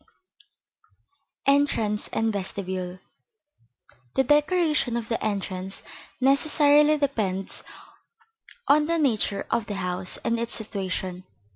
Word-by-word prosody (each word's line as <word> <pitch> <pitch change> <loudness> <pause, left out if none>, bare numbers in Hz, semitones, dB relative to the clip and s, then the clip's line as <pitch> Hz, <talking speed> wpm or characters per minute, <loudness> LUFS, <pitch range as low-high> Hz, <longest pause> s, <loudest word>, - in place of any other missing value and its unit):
VIII 275 - +6
ENTRANCE 215 -7 0
AND 225 -1 0
VESTIBULE 185 -2 -4 1.2
The 265 - +4
decoration 295 -3 +2
of 230 -2 -5
the 230 - -1
entrance 195 -2 -3 0.4
necessarily 295 +2 +4
depends 210 -10 -2 1.0
on 300 +1 +5
the 335 0 +1
nature 225 -9 +1
of 230 -2 0
the 205 - -3
house 180 -1 -2
and 230 0 0
its 235 0 -1
situation. 190 -4 -4
225 Hz, 105 wpm, -25 LUFS, 195-285 Hz, 1.2 s, VIII